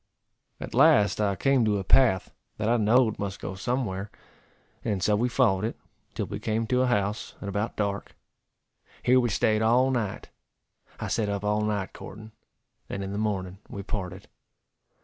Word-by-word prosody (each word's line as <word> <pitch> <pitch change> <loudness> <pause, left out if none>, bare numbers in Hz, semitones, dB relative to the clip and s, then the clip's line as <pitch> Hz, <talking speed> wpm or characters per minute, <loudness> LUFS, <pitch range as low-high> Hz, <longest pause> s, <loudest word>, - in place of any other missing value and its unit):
At - - -7
last 105 0 +5
I 100 -2 +1
came 135 +6 +3
to 105 -2 +2
a 95 - -3
path, 95 -2 +3 0.3
that 105 - -1
I 120 +1 +3
know'd 110 +1 +3
must 100 -1 -4
go - - -5
somewhere, 105 -2 -2 0.7
and 100 -5 -1
so 105 - +3
we 120 +4 +1
followed 110 -6 +2
it, 110 - -2 0.4
till - - -1
we - - -6
came 110 +1 -1
to 125 +2 +1
a 130 - +2
house, 105 -3 -1
at 100 - -7
about 100 +3 -2
dark. 100 -1 -2 0.9
Here 130 +1 +5
we 120 -1 +1
staid 110 +1 +2
all 125 +4 +4
night. 115 -6 -2 0.7
I - - -3
set 105 -3 0
up 100 0 -2
all 105 +1 +1
night 105 -3 -2
courting; 110 +2 -10 0.6
and 100 - -4
in 95 - -5
the 100 - -3
morning 95 -3 -2
we 100 - -6
parted. 95 -2 -5
105 Hz, 175 wpm, -27 LUFS, 100-115 Hz, 0.9 s, last